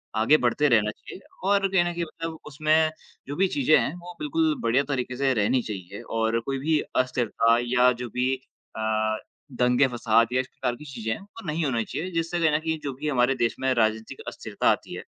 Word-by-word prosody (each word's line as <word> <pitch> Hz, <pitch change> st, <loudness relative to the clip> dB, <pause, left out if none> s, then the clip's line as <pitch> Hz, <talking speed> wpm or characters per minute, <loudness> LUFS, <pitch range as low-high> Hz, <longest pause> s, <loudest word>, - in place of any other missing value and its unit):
आगे 115 Hz, +8 st, +5 dB
बढ़ते 145 Hz, +5 st, +3 dB
रहना 105 Hz, -3 st, +3 dB
चाहिए 185 Hz, -, -12 dB, 0.2 s
और 200 Hz, 0 st, +3 dB
कहीं 190 Hz, -2 st, +3 dB
न 175 Hz, -, -1 dB
कहीं 170 Hz, 0 st, -2 dB
मतलब 165 Hz, 0 st, -6 dB
उसमें 155 Hz, +2 st, +2 dB, 0.4 s
जो 145 Hz, -, -4 dB
भी 190 Hz, +4 st, +3 dB
चीज़ें 250 Hz, -, +3 dB
हैं, 145 Hz, -, 0 dB
वो 175 Hz, 0 st, -10 dB
बिल्कुल 155 Hz, +1 st, +1 dB
बढ़िया 120 Hz, +4 st, +2 dB
तरीके 125 Hz, -1 st, -2 dB
से 135 Hz, -1 st, +2 dB
रहनी 120 Hz, +3 st, +2 dB
चाहिए। 100 Hz, -1 st, -7 dB
और 115 Hz, 0 st, 0 dB
कोई 135 Hz, +4 st, -3 dB
भी 155 Hz, +2 st, +2 dB, 0.2 s
अस्थिरता 120 Hz, -2 st, +2 dB
या 125 Hz, +1 st, +4 dB
जो 120 Hz, -, -4 dB
भी 125 Hz, +3 st, 0 dB, 0.4 s
अ, 110 Hz, 0 st, 0 dB, 0.3 s
दंगे, 125 Hz, +2 st, +3 dB
फसाद 115 Hz, -2 st, +2 dB
या 130 Hz, -, +3 dB
इस 130 Hz, -, -10 dB
प्रकार 125 Hz, -1 st, -3 dB
की 150 Hz, -, -12 dB
चीज़ें 115 Hz, -6 st, -4 dB
हैं, -, -, -7 dB
वो 205 Hz, +1 st, -13 dB
नहीं 155 Hz, +2 st, -1 dB
होने 120 Hz, -4 st, 0 dB
चाहिए, 175 Hz, +10 st, -4 dB
जिससे 165 Hz, 0 st, -1 dB
कहीं 160 Hz, -2 st, +3 dB
न 150 Hz, -, +2 dB
कहीं 160 Hz, 0 st, -2 dB
जो 140 Hz, -2 st, -3 dB
भी 150 Hz, +4 st, -5 dB
हमारे 135 Hz, -1 st, +2 dB
देश 115 Hz, -2 st, 0 dB
में 130 Hz, 0 st, +1 dB
राजनीतिक 110 Hz, +3 st, 0 dB
अस्थिरता -, -, -1 dB
आती -, -, -3 dB
है। -, -, -7 dB
130 Hz, 215 wpm, -25 LUFS, 115-160 Hz, 0.4 s, आगे